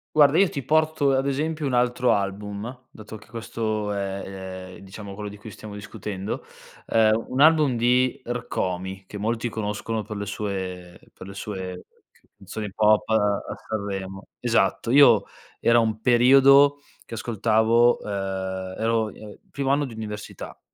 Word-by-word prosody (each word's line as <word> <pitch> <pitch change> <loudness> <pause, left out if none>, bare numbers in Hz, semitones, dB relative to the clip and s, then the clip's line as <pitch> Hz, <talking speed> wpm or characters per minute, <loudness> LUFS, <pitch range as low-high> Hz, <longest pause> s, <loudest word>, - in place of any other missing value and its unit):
Guarda 150 +1 +6
io 195 -2 +5
ti 140 - -4
porto, 155 0 +2
ad 135 0 +1
esempio, 155 +3 -1
un 135 - -1
altro 125 0 +2
album, 105 +4 -4
dato 110 0 -11
che 110 - -14
questo 110 -2 -3
è, 95 -1 -6
ehm, - - -12
diciamo 100 +1 -9
quello 105 +1 -6
di 105 - -11
cui 105 +1 -10
stiamo 105 +1 -10
discutendo. 105 -1 -6 0.4
Uhm, 110 0 +3
un 130 - -3
album 150 -4 +5
di 125 +2 +2
Rkomi 95 -5 -3
che 105 - -8
molti 115 +3 -1
conoscono 110 0 -3
per 105 0 -7
le 100 - -4
sue 95 -4 -5
per - - -11
le 100 - -9
sue 95 -2 -6 0.3
c - - -30
canzoni 105 -1 -6
pop 105 0 +3
a 105 -2 +2 0.3
Sanremo 95 -2 -4
Esatto, 115 -1 +1
io 140 +1 +7 0.4
era 115 0 +5
un 110 -1 0
periodo 135 +4 +6 0.3
che - - -11
ascoltavo 115 +1 +2
uhm, 95 -2 -4
ero, 115 0 +1
uhm, 105 0 -10
primo 140 -1 -3
anno 145 +1 +2
di 120 - -9
università, 105 -1 -7
110 Hz, 155 wpm, -24 LUFS, 100-125 Hz, 0.4 s, io